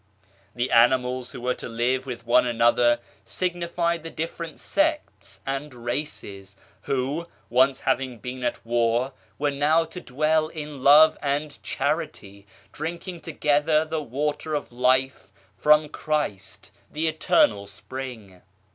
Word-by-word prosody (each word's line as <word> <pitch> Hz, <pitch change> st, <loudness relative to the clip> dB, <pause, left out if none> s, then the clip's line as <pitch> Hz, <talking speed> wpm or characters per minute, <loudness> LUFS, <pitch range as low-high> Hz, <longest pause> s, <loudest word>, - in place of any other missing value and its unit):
The 120 Hz, +1 st, -1 dB
animals 125 Hz, +1 st, +3 dB
who -, -, -8 dB
were 125 Hz, +1 st, 0 dB
to -, -, -8 dB
live 125 Hz, +3 st, 0 dB
with 120 Hz, -2 st, -6 dB
one 120 Hz, +1 st, +4 dB
another 120 Hz, 0 st, +3 dB, 0.2 s
signified 170 Hz, -1 st, -1 dB
the 165 Hz, -, -7 dB
different 165 Hz, 0 st, -5 dB
sects 300 Hz, 0 st, -2 dB
and 135 Hz, +2 st, -3 dB
races, 115 Hz, -6 st, -5 dB, 0.2 s
who, 140 Hz, +6 st, -2 dB, 0.2 s
once 130 Hz, +2 st, +3 dB
having 130 Hz, -2 st, 0 dB
been 125 Hz, +3 st, -7 dB
at 120 Hz, -, -2 dB
war, 120 Hz, +2 st, +1 dB, 0.2 s
were 145 Hz, 0 st, 0 dB
now 150 Hz, +4 st, +2 dB
to 170 Hz, +3 st, -9 dB
dwell 155 Hz, +3 st, +1 dB
in 150 Hz, -3 st, -7 dB
love 150 Hz, +3 st, +7 dB
and 145 Hz, +1 st, -2 dB
charity, 100 Hz, 0 st, -3 dB, 0.2 s
drinking 170 Hz, +3 st, -5 dB
together 150 Hz, 0 st, +2 dB
the 160 Hz, 0 st, -3 dB
Water 150 Hz, +3 st, -2 dB
of 145 Hz, -, -4 dB
Life 130 Hz, -1 st, +1 dB, 0.2 s
from 150 Hz, +5 st, +4 dB
Christ 150 Hz, -11 st, -3 dB, 0.2 s
the 160 Hz, +2 st, -1 dB
Eternal 105 Hz, -9 st, +2 dB
Spring. 110 Hz, -5 st, -8 dB
135 Hz, 130 wpm, -25 LUFS, 120-155 Hz, 0.2 s, love